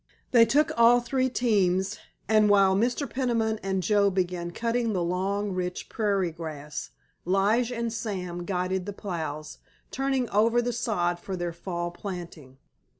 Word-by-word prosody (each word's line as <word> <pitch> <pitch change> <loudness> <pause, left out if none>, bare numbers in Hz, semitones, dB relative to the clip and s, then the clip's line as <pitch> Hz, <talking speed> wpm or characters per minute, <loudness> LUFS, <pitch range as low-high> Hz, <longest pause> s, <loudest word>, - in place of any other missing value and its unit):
They 235 -2 +7
took 295 +7 +3
all 235 +1 +6
three 260 +2 0
teams, 200 -4 +1 0.3
and 215 -1 +4
while 195 -2 +5
Mr. 245 +7 0
Peniman 230 -4 0
and 190 -1 -1
Joe 200 +2 +3
began 180 -2 -2
cutting 230 +4 -1
the 180 -3 0
long, 195 +4 -1
rich 180 -1 -4
prairie 200 -5 0
grass 150 - -6 0.3
Lige 205 +7 +2
and 235 -2 -2
Sam 180 -6 -4
guided 185 +1 -2
the 205 - -4
plows, 155 -6 -5 0.3
turning 270 -2 0
over 225 +4 +3
the 240 0 -1
sod 175 -7 -1
for 190 +2 -5
their 175 -1 -3
fall 175 0 -4
planting. 175 -8 -8
195 Hz, 150 wpm, -27 LUFS, 175-230 Hz, 0.3 s, They